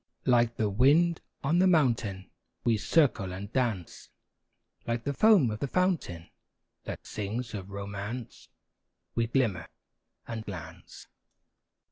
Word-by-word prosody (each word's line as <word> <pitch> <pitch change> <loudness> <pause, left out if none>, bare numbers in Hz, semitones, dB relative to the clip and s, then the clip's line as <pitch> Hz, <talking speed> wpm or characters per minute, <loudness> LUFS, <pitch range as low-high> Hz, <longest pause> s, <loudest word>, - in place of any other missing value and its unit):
Like 120 -2 +3
the 110 - +1
wind 145 - +4 0.2
on 155 +5 +2
the 190 - +5
mountain, 115 - +1 0.3
We 120 -2 +3
circle 115 - +2
and 100 +4 -7
dance; 115 -9 -2 0.8
Like 115 0 -1
the 140 - -1
foam 190 - +5
of 105 - -5
the 140 - -1
fountain, 165 - -1 0.5
That - - -6
sings 115 +3 -4
of 100 -2 -6
romance, 100 +4 -6 0.6
We 115 -1 0
glimmer 115 -9 0 0.6
and 115 -1 -5
glance. 95 -6 -9
115 Hz, 120 wpm, -29 LUFS, 100-135 Hz, 0.8 s, the